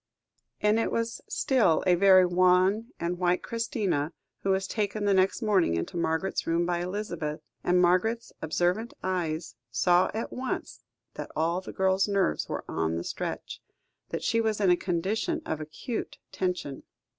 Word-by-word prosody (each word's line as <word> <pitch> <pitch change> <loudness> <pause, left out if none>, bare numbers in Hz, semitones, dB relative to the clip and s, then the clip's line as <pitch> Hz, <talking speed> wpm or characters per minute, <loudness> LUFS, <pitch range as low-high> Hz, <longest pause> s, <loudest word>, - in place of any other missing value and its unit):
And 210 +1 +3
it - - 0
was 230 0 -2
still 225 - +2
a 180 - +5
very 185 0 +6
wan 185 +4 +3
and 175 +1 -2
white 180 0 +1
Christina, 210 - -1 0.3
who 195 - -3
was 190 0 +2
taken 205 +1 -2
the 200 - +4
next 190 +5 +2
morning 195 - +3
into 85 - -3
Margaret's 165 +2 -1
room 165 +1 +2
by 175 0 0
Elizabeth; 175 -5 -4 0.2
and 180 0 +3
Margaret's 185 +7 +2
observant 180 +8 0
eyes 165 -8 -2 0.2
saw 175 +8 +3
at 225 - -4
once 255 0 -4 0.3
that - - -6
all 170 +3 0
the - - -8
girl's 190 +1 +2
nerves 195 - 0
were - - -4
on 80 0 -1
the 85 - -3
stretch, - - -5 0.5
that - - -4
she 230 0 +2
was 220 -2 0
in 195 -3 +4
a - - +6
condition 195 - -1
of 155 -1 -3
acute 160 +9 -5
tension. 180 -7 -3
185 Hz, 160 wpm, -28 LUFS, 170-210 Hz, 0.5 s, very